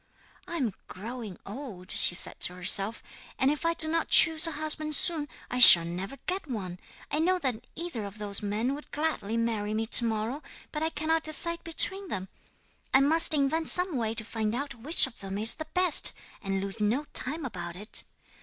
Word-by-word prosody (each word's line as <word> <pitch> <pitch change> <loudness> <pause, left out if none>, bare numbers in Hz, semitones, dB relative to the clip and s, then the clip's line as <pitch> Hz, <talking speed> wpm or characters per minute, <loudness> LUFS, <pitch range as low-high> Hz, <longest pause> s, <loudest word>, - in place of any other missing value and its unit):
'"I 340 - -7
am 245 - -3
growing 220 0 -10
old," 200 -4 -10
she 175 - +4
said - - 0
to 180 - -2
herself, 195 +4 -2 0.3
"and 265 +2 0
if 300 +3 -4
I 335 - -2
do 315 - +6
not 330 +1 -2
choose 320 0 +6
a 330 - -6
husband 305 0 -1
soon, 310 -1 +2 0.2
I 250 - -4
shall 175 -8 +11
never 185 +9 -8
get 370 -4 -6
one! 185 -7 -7 0.3
I 300 - -2
know 365 +3 0
that 245 -7 -5
either 325 -11 -7
of 200 +1 -11
those 205 -1 -2
men 215 +5 -4
would 295 +1 -11
gladly 295 -8 -4
marry 215 -2 -4
me 220 +1 -3
to 235 - +4
morrow, 225 +5 -4 0.3
but 300 - -6
I 320 - -2
cannot 320 0 -3
decide 335 +2 0
between 380 +4 -1
them. 190 - -7 0.6
I 265 - +3
must 315 +3 +3
invent 300 +3 0
some 360 -3 +1
way 225 -2 -4
to 220 - -2
find 220 0 -5
out 280 +2 -6
which 260 +8 +2
of 265 -3 -14
them 195 0 -8
is 220 +2 +4
the 315 - -10
best, 365 -3 +5 0.3
and 195 -1 -4
lose 195 +2 -6
no 225 +8 -2
time 290 +4 +1
about 175 -7 -8
it." 210 +5 -3
250 Hz, 200 wpm, -26 LUFS, 210-315 Hz, 0.6 s, shall